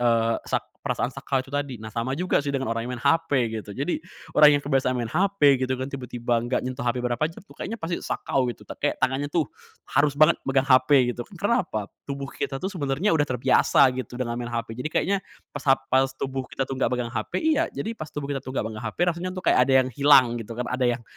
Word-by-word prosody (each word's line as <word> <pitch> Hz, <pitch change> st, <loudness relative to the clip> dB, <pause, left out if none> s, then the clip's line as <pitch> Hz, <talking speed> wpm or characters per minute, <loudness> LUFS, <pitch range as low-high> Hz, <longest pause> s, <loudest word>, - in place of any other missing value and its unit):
eee, 115 Hz, -1 st, +2 dB
sak -, -, 0 dB, 0.2 s
perasaan 125 Hz, -, -2 dB
sakau 135 Hz, 0 st, -1 dB
itu 135 Hz, -, -16 dB
tadi. 145 Hz, -3 st, -2 dB
Nah, 110 Hz, 0 st, -9 dB
sama 120 Hz, +4 st, -2 dB
juga, 180 Hz, +3 st, +1 dB
sih, 145 Hz, -, -5 dB
dengan 130 Hz, -4 st, -1 dB
orang 115 Hz, +1 st, -3 dB
yang 125 Hz, -, -4 dB
main -, -, -11 dB
HP, 145 Hz, -8 st, +2 dB
gitu. 105 Hz, -, -12 dB
Jadi, 145 Hz, +6 st, -1 dB, 0.3 s
orang 150 Hz, -1 st, +7 dB
yang 145 Hz, -, -3 dB
kebiasaan 130 Hz, -2 st, +1 dB
main 120 Hz, -1 st, -3 dB
HP 160 Hz, -7 st, +3 dB
gitu, 130 Hz, 0 st, 0 dB
kan, 130 Hz, +1 st, -3 dB
tiba-tiba 120 Hz, -3 st, -1 dB
enggak 120 Hz, +2 st, -1 dB
nyentuh 130 Hz, 0 st, -4 dB
HP 120 Hz, +1 st, 0 dB
berapa 120 Hz, -1 st, -1 dB
jam, 165 Hz, -, -12 dB
tuh, -, -, -17 dB
kayaknya 225 Hz, +4 st, -4 dB
pasti 170 Hz, -4 st, -3 dB
sakau, 130 Hz, -2 st, -1 dB
gitu. 120 Hz, -, -7 dB, 0.2 s
Kayak 145 Hz, -, 0 dB
tangannya, 135 Hz, +2 st, +1 dB
tuh, 160 Hz, +1 st, +1 dB, 0.5 s
harus 145 Hz, 0 st, +3 dB
banget 155 Hz, +3 st, +5 dB
megang 135 Hz, 0 st, +3 dB
HP 130 Hz, -1 st, +4 dB
gitu. 120 Hz, -, -8 dB, 0.2 s
Kenapa? 195 Hz, -, 0 dB, 0.2 s
Tubuh 140 Hz, 0 st, -4 dB
kita, 135 Hz, -, -3 dB
tuh, 190 Hz, +1 st, -2 dB
sebenernya 155 Hz, +3 st, 0 dB
udah 150 Hz, -2 st, +2 dB
terbiasa, 130 Hz, +1 st, +4 dB
gitu, 125 Hz, -1 st, -6 dB
dengan 120 Hz, -1 st, -3 dB
main 120 Hz, -, -4 dB
HP, 115 Hz, -1 st, -3 dB
jadi, 125 Hz, -, -2 dB
kayaknya 200 Hz, +1 st, +1 dB, 0.3 s
pas 145 Hz, -, -7 dB
hap 135 Hz, 0 st, +4 dB
pas 135 Hz, +1 st, +4 dB
tubuh 135 Hz, -1 st, -4 dB
kita, 135 Hz, -, -2 dB
tuh, 135 Hz, 0 st, -5 dB
enggak -, -, +2 dB
megang 120 Hz, -1 st, -3 dB
HP -, -, -4 dB
iya, 315 Hz, -2 st, +3 dB
jadi, 225 Hz, -, -4 dB
pas 155 Hz, -9 st, -7 dB
tubuh 145 Hz, -1 st, -6 dB
kita, 135 Hz, -, -2 dB
tuh, -, -, -11 dB
enggak -, -, 0 dB
megang 110 Hz, -, -7 dB
HP 110 Hz, -2 st, -5 dB
rasanya, 175 Hz, +2 st, -4 dB
tuh, 185 Hz, -, -6 dB
kayak -, -, +4 dB
ada -, -, +3 dB
yang -, -, -4 dB
hilang, 130 Hz, -3 st, +5 dB
gitu, 115 Hz, +1 st, -8 dB
kan. 125 Hz, -, -2 dB
Ada 125 Hz, 0 st, +1 dB
yang -, -, -17 dB
135 Hz, 240 wpm, -25 LUFS, 125-145 Hz, 0.5 s, orang